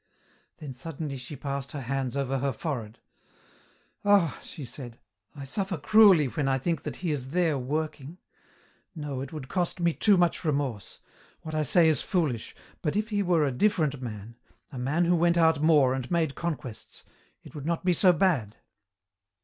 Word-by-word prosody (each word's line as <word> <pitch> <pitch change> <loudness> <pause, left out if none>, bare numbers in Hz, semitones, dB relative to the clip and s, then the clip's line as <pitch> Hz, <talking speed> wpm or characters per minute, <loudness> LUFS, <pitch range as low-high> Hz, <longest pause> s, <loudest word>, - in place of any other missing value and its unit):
Then 145 -4 -8
suddenly 145 +1 -6
she 130 +3 -7
passed 140 +1 -5
her 145 - -4
hands 135 +1 -2
over 135 -1 -1
her 140 +1 0
forehead. 115 -4 -5 1.1
"Ah!" 200 -6 +3
she 145 - -9
said, 120 -1 -9 0.4
"I 140 - -8
suffer 190 +6 -2
cruelly 195 -1 +6
when 135 +2 -2
I 135 0 +2
think 165 +5 -1
that - - -5
he 175 -3 -3
is 135 -3 -3
there 165 -1 +1
working. 150 +3 -4 0.8
No, 145 -4 -4
it 135 - -6
would 150 -4 -7
cost 180 +2 -2
me 170 -1 +2
too 205 +2 +4
much 175 0 +1
remorse. 140 - -2 0.4
What 155 - -7
I 155 - +1
say 160 +3 +4
is 155 -2 +2
foolish, 150 - -1 0.3
but 150 0 -1
if 215 +2 -1
he 205 -2 0
were 175 -5 +2
a 140 - 0
different 155 - +1
man, 115 -1 -7 0.3
a 130 - -7
man 150 +8 +1
who 175 +1 +3
went 170 0 +3
out 160 -3 +4
more 150 -5 +4
and 130 -2 -4
made 165 -4 +1
conquests, 145 -10 -6 0.4
it - - -13
would 145 -1 -6
not 170 +1 -2
be 180 - +4
so 180 +2 +5
bad." 155 - +1
150 Hz, 180 wpm, -27 LUFS, 135-170 Hz, 1.1 s, cruelly